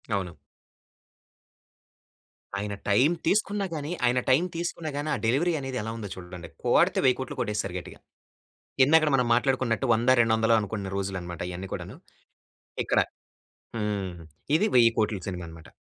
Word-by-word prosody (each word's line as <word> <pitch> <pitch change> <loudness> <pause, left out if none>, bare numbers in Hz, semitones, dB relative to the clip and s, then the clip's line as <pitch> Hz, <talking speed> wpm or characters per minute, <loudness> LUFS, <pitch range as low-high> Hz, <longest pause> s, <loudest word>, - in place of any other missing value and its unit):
అవును. 90 -5 -4 2.2
ఆయన 100 0 -3 0.2
టైమ్ 130 +11 +4
తీసుకున్నా 205 +1 +1
గాని 150 +1 -4
ఆయన 125 +1 +3
టైమ్ 155 +8 +4
తీసుకున్నా 170 -2 -3
గాని 145 +2 -2
ఆ - - +2
డెలివరీ 150 +10 +2
అనేది 135 -1 -4
ఎలా 110 - -4
ఉందో 105 -3 -6
చూడండి. 90 -1 -9
కోడితే - - +3
10000000000 - - +1
కొట్టేస్తారు 100 -3 -2
గట్టిగా. - - -12 0.9
ఇందాకడ 155 +1 +5
మనం 125 -2 +2
మాట్లాడుకున్నట్టు 130 0 +1
వంద, 115 +3 +1
రెండు 115 -1 +2
వందలో 115 +1 +3
అనుకున్న 100 -2 -4
రోజులన్నమాట 95 -3 -4
ఇయన్నీ 95 +2 -6
కూడాను. - - -6 0.9
ఇక్కడ. - - +1 0.8
హ్మ్. 105 -3 -2 0.5
ఇది 210 - +2
10000000000 115 -3 +3
సినిమా 90 -2 -4
అన్నమాట. 80 -1 -12
115 Hz, 135 wpm, -27 LUFS, 95-140 Hz, 2.2 s, ఇందాకడ